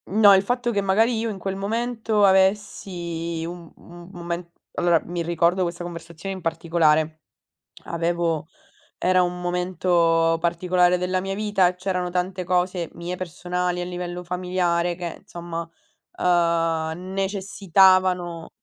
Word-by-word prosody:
No, 205 0 +6
il 190 - +5
fatto 245 +3 -1
che 205 -3 0
magari 220 +5 +2
io 230 0 -1
in 205 - -5
quel 190 +1 -4
momento 225 +1 -1
avessi 180 -4 0
un 170 -1 -8
mhmm, 175 0 -14
mome 170 -1 -5 0.2
allora, 175 -2 +3
mi 175 0 -3
ricordo 170 +2 +1
questa 175 0 -4
conversazione 170 +2 -7
in 190 - -8
particolare, 160 -1 +1 0.6
avevo 170 -2 -1 0.5
era 185 0 +3
un 180 0 -2
momento 175 -2 +2
particolare 180 +1 +2
della 185 +1 0
mia 195 +1 -3
vita, 195 -3 +2
c'erano 180 -1 -2
tante 180 +1 -2
cose 180 -1 0
mie 175 +1 -5
personali 180 0 -3
a - - -2
livello 180 0 -5
familiare 180 -1 0
che 170 -1 -6
insomma, 170 -1 -6 0.6
uhm, 170 0 +1
necessitavano 190 -3 +2
180 Hz, 130 wpm, -23 LUFS, 170-190 Hz, 0.6 s, No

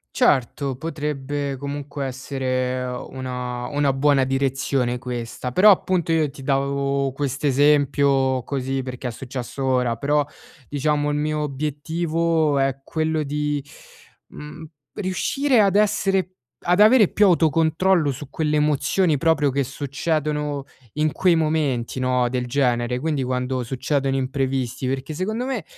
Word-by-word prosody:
Certo, 135 +1 +1
potrebbe 145 -2 -3
comunque 140 +1 -5
essere 130 -1 -2
una 125 -1 -5
una 145 -2 +1
buona 135 -1 +3
direzione 135 -2 0
questa, 120 0 -5
però 205 +7 +7
appunto 180 -3 +1
io 160 -2 +2
ti 135 -1 -12
davo 140 0 0
quest'esempio, 140 -1 +2
così 135 -1 -2
perché 125 0 -5
è 120 - -3
successo 130 +2 -6
ora, 125 -3 +1
però 145 +2 +1 0.4
diciamo 145 +1 0
il - - -1
mio 150 +1 -1
obiettivo 155 +2 0
è 135 0 0
quello 160 0 -1
di, 150 0 -2 0.6
mhmm, 150 +2 -10 0.3
riuscire 240 +7 +1
ad 200 0 +3
essere 195 -3 +1 0.3
ad 180 +4 +3
avere 220 -1 +7
più 210 - +3
autocontrollo 165 0 +3
su 135 +1 -8
quelle 150 0 0
emozioni 150 +2 +2
proprio 150 -2 +2
che 140 +1 0
succedono 145 +1 -2 0.3
in 150 0 +1
quei 180 -2 +3
momenti, 150 -6 0
no, 125 -1 +2
del 125 0 -2
genere, 125 -2 0
quindi 150 -2 -1
quando 125 0 -2
succedono 135 +2 -1
imprevisti, 130 -1 -2
perché 135 +3 -3
secondo 215 +9 -2
me 265 0 -3
140 Hz, 130 wpm, -22 LUFS, 130-155 Hz, 0.6 s, però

